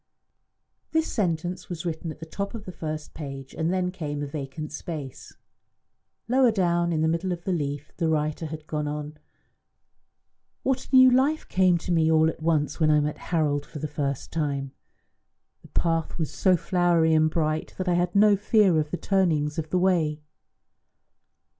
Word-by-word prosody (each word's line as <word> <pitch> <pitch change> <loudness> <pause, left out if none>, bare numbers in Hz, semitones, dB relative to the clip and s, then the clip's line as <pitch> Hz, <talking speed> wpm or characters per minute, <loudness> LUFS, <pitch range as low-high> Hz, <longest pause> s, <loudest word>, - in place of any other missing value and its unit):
This 320 0 +2
sentence 175 - -2
was 175 -1 -5
written 165 0 -3
at 155 - -8
the 160 - -7
top 200 +6 -5
of 215 -2 -7
the 185 - -6
first 155 -3 -6
page, 135 -3 -7
and 160 +1 -1
then 185 -1 0
came 145 -5 -4
a - - -2
vacant 145 +1 -6
space. 150 -4 -7 0.9
Lower 255 +1 +4
down, 175 -4 +1
in 155 -2 0
the - - +3
middle 170 +3 0
of 175 -1 -4
the 190 - -1
leaf, 145 -2 -3
the 165 -2 +1
writer 155 +1 -1
had 155 0 -8
gone 150 -1 -3
on: 150 +1 -5 1.4
"What 265 -1 -1
a 265 - +2
new 260 0 +8
life 275 +5 +2
came 185 -2 +3
to 175 - -5
me 160 -1 +3
all 160 0 +4
at 160 - -15
once 155 -1 0
when 155 -1 +3
I 150 0 +5
met 150 0 -2
Harold 150 -4 +1
for 150 - -10
the 155 +1 -3
first 140 -2 -3
time! 140 -4 -2 0.9
The - - -15
path 165 -2 -1
was 160 -4 -2
so 185 -2 +3
flowery 170 -2 +2
and 155 0 +4
bright 155 -1 -1
that 185 - -3
I 180 - +3
had 175 +1 0
no 205 0 +6
fear 200 -4 +3
of 150 -1 -1
the 175 - -3
turnings 165 -7 +1
of 155 -1 -4
the 185 - +1
way. 165 -5 +1
160 Hz, 185 wpm, -26 LUFS, 150-180 Hz, 1.4 s, new